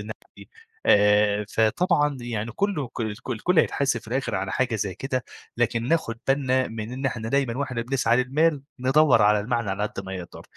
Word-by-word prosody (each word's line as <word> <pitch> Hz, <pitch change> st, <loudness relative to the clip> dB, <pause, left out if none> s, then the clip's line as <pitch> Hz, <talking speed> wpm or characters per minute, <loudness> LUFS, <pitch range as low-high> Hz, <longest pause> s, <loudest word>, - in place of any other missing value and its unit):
النِعم -, -, -8 dB
دي، -, -, -25 dB, 0.6 s
آآ 105 Hz, 0 st, +4 dB
فطبعًا 145 Hz, -, +2 dB
يعني 115 Hz, -2 st, -4 dB
كلّه 170 Hz, -, -1 dB
ك 120 Hz, -, -8 dB
الك 110 Hz, +2 st, -4 dB
الكلّ 160 Hz, +9 st, +1 dB
هيتحاسب 135 Hz, -5 st, +1 dB
في -, -, -15 dB
الآخر 125 Hz, -2 st, -2 dB
على 95 Hz, +1 st, -2 dB
حاجة 125 Hz, -3 st, 0 dB
زي 100 Hz, -2 st, -3 dB
كده، 130 Hz, +4 st, -3 dB, 0.3 s
لكن 120 Hz, 0 st, 0 dB
ناخد 145 Hz, -8 st, 0 dB
بالنا 130 Hz, -2 st, +2 dB
من 110 Hz, +1 st, -6 dB
إن 135 Hz, +1 st, -3 dB
إحنا 115 Hz, -3 st, -3 dB
دايمًا 135 Hz, -2 st, 0 dB
وإحنا 125 Hz, -4 st, -2 dB
بنسعى 120 Hz, -2 st, +1 dB
للمال، 145 Hz, +2 st, +1 dB, 0.2 s
ندوّر 135 Hz, +2 st, +4 dB
على 105 Hz, 0 st, +4 dB
المعنى 115 Hz, -2 st, -1 dB
على 100 Hz, +2 st, -2 dB
قد 105 Hz, -, -3 dB
ما 95 Hz, 0 st, -5 dB
نقدر، 85 Hz, -1 st, -10 dB
120 Hz, 185 wpm, -24 LUFS, 110-135 Hz, 0.6 s, آآ